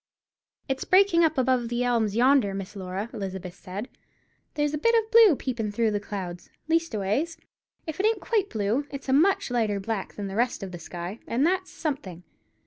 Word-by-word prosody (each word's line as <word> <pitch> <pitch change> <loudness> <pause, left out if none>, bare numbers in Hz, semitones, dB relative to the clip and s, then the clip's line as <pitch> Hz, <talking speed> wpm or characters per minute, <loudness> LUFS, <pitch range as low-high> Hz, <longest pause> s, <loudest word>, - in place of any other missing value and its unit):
"It's 265 0 -2
breaking 370 -2 +5
up 315 -2 +2
above 255 -2 +2
the 240 +1 0
elms 230 -4 +1
yonder, 245 -4 +4
Miss 195 +1 -6
Laura," 190 +2 -4
Elizabeth 190 -4 -5
said; 195 +5 -7 0.7
"there's 295 0 0
a 300 - -1
bit 465 +9 +3
of 445 0 +1
blue 450 -8 +8
peepin' 235 -6 -3
through 220 +1 +1
the 205 - 0
clouds; 190 -4 -6 0.2
leastways, 320 - 0 0.5
if 315 +1 -6
it 410 - +4
ain't 450 - +1
quite 420 -4 0
blue, 220 +7 -1
it's 275 -1 -7
a - - +3
much 325 0 +3
lighter 220 -4 +1
black 200 0 -4
than 205 - -5
the 195 0 -5
rest 240 -1 0
of 190 - -6
the 175 - -7
sky, 175 +6 -7
and 255 +5 +1
that's 370 +2 0
something. 195 - -5
240 Hz, 190 wpm, -26 LUFS, 200-310 Hz, 0.7 s, blue